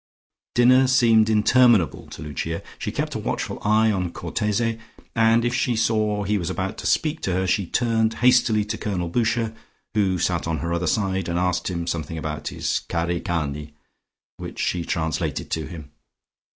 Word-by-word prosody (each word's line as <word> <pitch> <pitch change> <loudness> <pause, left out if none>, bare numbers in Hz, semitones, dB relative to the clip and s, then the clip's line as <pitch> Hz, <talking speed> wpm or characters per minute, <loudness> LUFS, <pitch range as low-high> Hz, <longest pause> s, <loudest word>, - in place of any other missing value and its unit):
Dinner 130 +2 +5
seemed 115 -4 +4
interminable 110 -3 +3
to - - -9
Lucia. 75 +3 -4 0.2
She - - -3
kept - - -3
a - - -3
watchful - - -3
eye 110 +1 +3
on 90 -3 -1
Cortese, 115 +4 -1 0.4
and 115 +1 +4
if 120 - 0
she 125 -1 +1
saw 110 -2 +1
he 105 +1 0
was 85 -1 -3
about 95 +1 -3
to - - -3
speak 155 0 +1
to 95 - -1
her, 95 +1 0
she 95 0 0
turned 115 +1 +1
hastily 120 -4 +3
to 110 +1 -4
Colonel 90 -4 -2
Boucher, 115 +1 0 0.4
who 100 -4 +1
sat 85 -1 -1
on 80 -1 -1
her 85 +4 -3
other 85 +1 -1
side, 95 -1 0
and 85 - -1
asked 90 +1 0
him 85 -2 -3
something 80 -1 -3
about 75 -1 -4
his - - -1
cari 85 0 -1
cani, 75 -3 -3 0.6
which - - -8
she 90 -1 -1
translated 80 -2 -2
to 80 -3 -2
him. 75 -3 -10
100 Hz, 175 wpm, -23 LUFS, 85-115 Hz, 0.6 s, Dinner